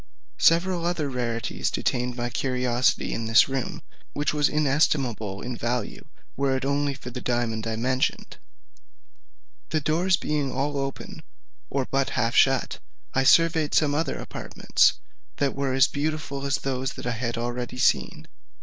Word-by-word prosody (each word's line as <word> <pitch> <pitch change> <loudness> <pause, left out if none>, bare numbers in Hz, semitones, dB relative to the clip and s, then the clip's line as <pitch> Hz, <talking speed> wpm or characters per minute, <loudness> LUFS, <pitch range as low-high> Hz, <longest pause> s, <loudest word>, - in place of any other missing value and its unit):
Several 170 +1 +3
other 170 -4 -1
rarities 115 -2 -2
detained 125 0 -1
my 120 0 -3
curiosity 125 -1 0
in 115 - -3
this 115 +2 +5
room, 135 -1 -4 0.3
which 145 +1 0
was 145 -1 +2
inestimable 135 -8 0
in 125 0 -4
value, 120 -1 -3 0.3
were 135 -1 +1
it 130 - -4
only 140 0 0
for 125 -1 -9
the 125 +1 -6
diamond 115 -2 -1
I 110 - -1
mentioned. 130 +3 -1 1.3
The 155 - +1
doors 170 +5 +2
being 145 -3 -1
all 145 +3 -1
open, 135 -1 -5 0.5
or 135 -1 -1
but 135 +1 0
half 115 0 +1
shut, 135 -2 +3 0.3
I 135 - +2
surveyed 160 +1 +4
some 145 -2 +3
other 160 +3 -1
apartments, - - +1 0.4
that 140 -1 0
were 135 -1 -1
as 135 0 +6
beautiful 145 -2 -3
as 140 - +2
those 135 -1 -3
I 125 - -3
had 120 0 -3
already 120 +1 -4
seen. 125 - +1
135 Hz, 150 wpm, -25 LUFS, 120-145 Hz, 1.3 s, as